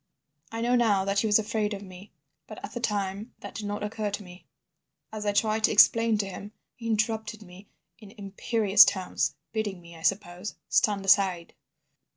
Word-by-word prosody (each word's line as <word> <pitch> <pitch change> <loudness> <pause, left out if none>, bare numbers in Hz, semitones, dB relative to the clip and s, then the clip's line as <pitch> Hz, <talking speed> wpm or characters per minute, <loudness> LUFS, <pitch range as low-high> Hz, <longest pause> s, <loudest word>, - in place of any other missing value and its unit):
"I 225 0 -4
know 240 +1 +2
now 210 -6 +2
that 200 0 +1
he 220 - +1
was 210 - +5
afraid 215 -1 -1
of 200 - -9
me, 185 +1 -13 0.4
but - - -10
at - - -12
the 240 - -4
time 205 0 -3
that - - -8
did 210 -2 -5
not 205 0 -4
occur 210 0 -3
to 205 +1 -5
me. 180 0 -14 0.6
As 215 -1 -5
I - - +3
tried 215 +1 +1
to - - +1
explain 225 +1 +5
to 205 - -1
him, 200 +2 -9 0.2
he 230 - -8
interrupted 220 -1 -1
me 190 +2 -15 0.3
in 210 -3 -13
imperious 205 +1 +4
tones, 185 -2 -1 0.2
bidding 210 -4 -3
me, 170 -1 -14
I 165 - -13
suppose, 190 +1 -2
stand 200 -2 +2
aside. 190 -3 +2
205 Hz, 190 wpm, -27 LUFS, 195-220 Hz, 0.6 s, was